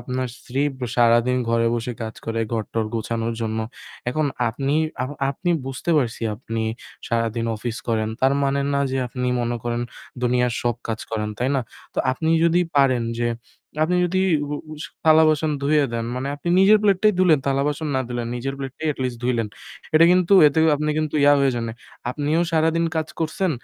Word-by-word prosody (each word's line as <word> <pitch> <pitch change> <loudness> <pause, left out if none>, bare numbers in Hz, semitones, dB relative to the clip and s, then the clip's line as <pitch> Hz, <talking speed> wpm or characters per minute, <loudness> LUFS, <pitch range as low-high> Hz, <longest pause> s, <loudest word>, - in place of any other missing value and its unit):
আপনার 125 +1 -3
স্ত্রী 135 +3 -2 0.2
ব - - -19 0.2
সারাদিন 120 +1 +4
ঘরে 115 0 +2
বসে 120 +1 -3
কাজ 110 0 -5
করে 115 0 -2
ঘর-টর 115 0 -1
গোছানোর 115 +1 -2
জন্য। 110 -1 -2 0.5
এখন 150 +4 0 0.2
আপনি 135 +5 -1 0.3
আ - - 0 0.3
আপনি 175 +6 -2 0.2
বুঝতে 135 +5 -3
পারছি 120 -5 0
আপনি 115 0 -4 0.5
সারাদিন 115 0 0
অফিস 115 +1 -4
করেন। 110 -1 +1
তার 135 +1 +4
মানে 140 0 +1
না 140 - +1
যে 135 - -1
আপনি 125 +1 -3
মনে 120 0 -1
করেন 120 0 -1 0.4
দুনিয়ার 125 0 +2
সব 120 -1 +1
কাজ 110 -1 -2
করেন, 105 -1 -2
তাই 125 - 0
না? 135 - +1 0.3
তো - - -3
আপনি 160 +5 -2 0.2
যদি 170 +1 +4 0.2
পারেন 130 -4 +4 0.2
যে 120 - +1 0.6
আপনি 180 +3 +1
যদি 185 +2 0 0.2
উ 145 - -5 0.2
উ - - -7 0.3
থালা-বাসন 155 -1 +5
ধুয়ে 150 +1 +3
দেন 115 -1 -2
মানে 130 +2 -3
আপনি 145 +4 -6
নিজের 210 +3 +6
প্লেটটাই 210 +1 +4
ধুলেন, 175 -6 +5
থালা-বাসন 145 +3 0
না 130 - +2
দিলেন 120 -1 -3
নিজের 135 +3 -3
প্লেটটাই 135 +3 -4
at - - -24
least 125 -2 -3
ধুইলেন। 120 -3 0 0.5
এটা 160 - +7
কিন্তু 180 +1 +2
এতে 145 +2 +2 0.2
আপনি 150 +1 -1
কিন্তু 155 -1 -2
ইয়া 145 - +7
হয়ে 135 -1 +3
জান 120 -1 -2
নাই। 110 - -6 0.4
আপনিও 150 +4 0
সারাদিন 165 +1 +2
কাজ 160 0 -1
করছেন। 165 +3 0
130 Hz, 185 wpm, -22 LUFS, 115-155 Hz, 0.6 s, এটা